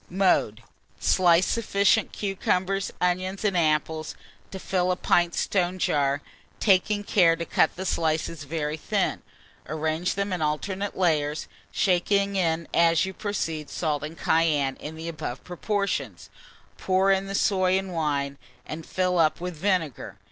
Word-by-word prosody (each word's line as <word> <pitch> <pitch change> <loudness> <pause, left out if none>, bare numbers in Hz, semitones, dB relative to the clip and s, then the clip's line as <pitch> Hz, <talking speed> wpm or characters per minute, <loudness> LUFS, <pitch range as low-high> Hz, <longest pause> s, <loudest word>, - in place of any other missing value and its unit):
Mode. 175 - +1 0.4
Slice 175 -1 +4
sufficient 210 -1 +2
cucumbers, 195 -1 -1
onions, 185 +3 -1
and 200 -3 +1
apples 155 -1 0 0.3
to 190 - -7
fill 185 -1 0
a - - +1
pint 175 -1 +2
stone 185 -1 0
jar, 145 -4 +1 0.4
taking 205 +1 +3
care 175 -5 +4
to 170 0 -5
cut 160 - +2
the 190 - -5
slices 160 -2 -1
very 150 0 -3
thin; - - -1 0.5
arrange 160 +3 -1
them 200 0 -1
in 180 - -3
alternate 190 +7 -2
layers, 155 -4 +1 0.2
shaking 200 +2 +1
in 170 -3 0
as 170 0 +4
you 190 - -5
proceed 165 -8 -3
salt 150 0 -1
and 155 +2 -6
cayenne 150 -5 +2
in 155 +1 -8
the 160 +1 -7
above 155 -6 -5
proportion; 200 +3 -2 0.6
pour 190 +1 +2
in 195 0 +1
the 195 - -4
soy 185 -2 +2
and 190 -1 -4
wine, 140 -4 -1 0.3
and 155 +1 -7
fill 180 -1 0
up 155 -2 +3
with 180 0 -5
vinegar. 165 - -1
175 Hz, 145 wpm, -26 LUFS, 155-190 Hz, 0.6 s, Slice